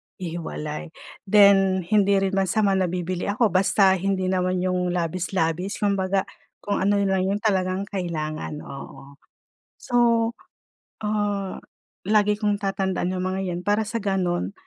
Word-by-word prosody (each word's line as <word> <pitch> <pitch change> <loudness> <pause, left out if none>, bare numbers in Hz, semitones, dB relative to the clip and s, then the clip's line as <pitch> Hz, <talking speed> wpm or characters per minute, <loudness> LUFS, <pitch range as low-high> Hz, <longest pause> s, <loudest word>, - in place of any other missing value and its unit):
ihiwalay. 165 -2 -5 0.4
Then, 195 -2 +5
hindi 200 +2 +3
rin 190 - 0
masama 195 +1 +1
na 190 -2 +2
bibili 180 +1 -3
ako, 210 +1 +2
basta 190 +1 +4
hindi 190 0 0
naman 185 -1 0
yung 180 -1 0
labis-labis 180 +1 -1
kumbaga, 195 -1 +1 0.4
kung 205 - -1
ano 200 +2 +2
lang 190 -1 +1
yung 200 +2 -1
talagang 190 -2 +1
kailangan, 155 -6 -4
oo. 140 0 -11 0.6
So, 245 - -6 1.1
ah, 205 -2 -1 0.5
lagi 210 +1 +3
kong 205 -1 0
tatandaan 190 -2 -1
yung 185 - -2
mga 185 +1 -2
yan, 175 0 -3
para 205 +1 +2
sa 230 - -3
gano'n 185 - -1
190 Hz, 130 wpm, -24 LUFS, 180-200 Hz, 1.1 s, Then